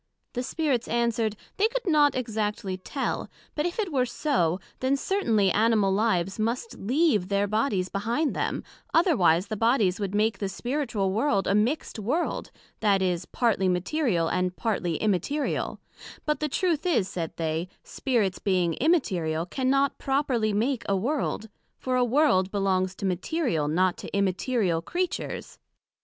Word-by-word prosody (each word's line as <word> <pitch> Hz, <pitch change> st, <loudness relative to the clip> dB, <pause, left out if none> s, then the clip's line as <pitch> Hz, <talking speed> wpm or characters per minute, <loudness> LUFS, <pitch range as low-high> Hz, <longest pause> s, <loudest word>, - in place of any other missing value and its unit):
The 245 Hz, -, -2 dB
Spirits 265 Hz, -2 st, -1 dB
answered, 235 Hz, -2 st, 0 dB, 0.2 s
They 420 Hz, -, +4 dB
could -, -, -4 dB
not 300 Hz, -5 st, +4 dB
exactly 210 Hz, -5 st, -2 dB
tell; 225 Hz, +9 st, -3 dB, 0.2 s
but 300 Hz, +2 st, 0 dB
if 350 Hz, -, -5 dB
it 410 Hz, -6 st, -1 dB
were 255 Hz, -2 st, +2 dB
so, 190 Hz, -, 0 dB, 0.2 s
then 265 Hz, +2 st, +1 dB
certainly 225 Hz, -, +1 dB
Animal 215 Hz, -2 st, +3 dB
lives 195 Hz, -2 st, +1 dB
must 235 Hz, -, -2 dB
leave 240 Hz, -, +2 dB
their 200 Hz, 0 st, +1 dB
bodies 205 Hz, -3 st, 0 dB
behind 235 Hz, +10 st, -1 dB
them, -, -, -2 dB, 0.3 s
otherwise 190 Hz, -, +4 dB
the 220 Hz, -, -4 dB
bodies 220 Hz, -4 st, +2 dB
would 200 Hz, -1 st, -2 dB
make 215 Hz, +1 st, +1 dB
the 200 Hz, -, -2 dB
spiritual 240 Hz, -5 st, -1 dB
World 215 Hz, -3 st, +1 dB
a -, -, +1 dB
mixt 230 Hz, +4 st, 0 dB
World, 270 Hz, -, -1 dB, 0.3 s
that 200 Hz, -3 st, +3 dB
is, 180 Hz, -2 st, 0 dB
partly 205 Hz, -6 st, +1 dB
material, 180 Hz, -, +1 dB
and 180 Hz, +2 st, 0 dB
partly 185 Hz, -7 st, -1 dB
immaterial; 215 Hz, -, -1 dB, 0.5 s
but 300 Hz, 0 st, 0 dB
the 300 Hz, -, -1 dB
Truth 345 Hz, +1 st, 0 dB
is, 220 Hz, -, +2 dB
said 165 Hz, -4 st, -4 dB
they, 160 Hz, +1 st, -1 dB, 0.2 s
Spirits 220 Hz, -8 st, -1 dB
being 180 Hz, -4 st, +1 dB
immaterial, 180 Hz, -, +1 dB
cannot 270 Hz, +6 st, +1 dB
properly 270 Hz, -6 st, +1 dB
make 230 Hz, +4 st, 0 dB
a 200 Hz, -, +3 dB
World; 240 Hz, 0 st, -1 dB, 0.3 s
for 255 Hz, -1 st, -2 dB
a 250 Hz, -, +3 dB
World 245 Hz, -7 st, +3 dB
belongs 190 Hz, -2 st, 0 dB
to 195 Hz, -, -5 dB
material, 185 Hz, -, 0 dB
not 180 Hz, +4 st, +2 dB
to -, -, -7 dB
immaterial 195 Hz, -2 st, +1 dB
Creatures. 355 Hz, -, -3 dB
220 Hz, 150 wpm, -26 LUFS, 190-275 Hz, 0.5 s, They